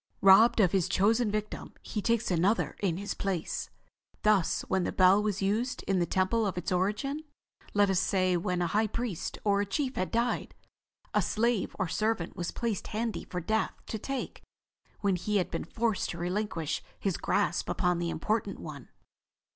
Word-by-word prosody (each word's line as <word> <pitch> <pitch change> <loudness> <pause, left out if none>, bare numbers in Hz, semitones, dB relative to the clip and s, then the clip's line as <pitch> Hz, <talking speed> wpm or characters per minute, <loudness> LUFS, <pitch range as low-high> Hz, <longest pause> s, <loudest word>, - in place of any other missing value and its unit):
Robbed 195 +5 +7
of 185 -5 +5
his 190 -4 +1
chosen 220 +4 +3
victim, 210 0 -4
he 210 - -3
takes 230 -1 +1
another 180 +6 +2
in 180 -5 0
his 200 +2 -3
place. 190 -4 -3 0.5
Thus 210 -5 +3
when 190 -1 0
the - - -1
bell 185 +2 +5
was 205 -2 -1
used 225 +6 0
in 195 -2 +1
the 175 - +1
temple 190 +5 +1
of 190 -2 -3
its 180 - -3
origin—let 210 - -1
us 190 -2 +2
say 185 -1 +2
when 180 +1 0
a 170 - -2
high 215 +1 +3
priest 225 -5 -3
or 200 -1 +3
a - - 0
chief 265 +5 -2
had 185 - 0
died—a 235 +1 -3
slave 230 -1 0
or 195 - 0
servant 200 0 -1
was 175 -2 -3
placed 230 -5 -2
handy 225 +1 -3
for 180 - -4
Death 220 +6 0
to 220 - -4
take 270 +4 -4 0.6
when 195 -3 +2
he 205 +4 0
had 185 - 0
been - - -3
forced 225 +2 -1
to 175 - -5
relinquish 175 -3 -2 0.2
his 195 -4 0
grasp 175 - 0
upon 180 -1 +1
the 170 0 -1
important 205 +4 -1
one." 145 -5 -9
200 Hz, 175 wpm, -30 LUFS, 180-220 Hz, 0.6 s, Robbed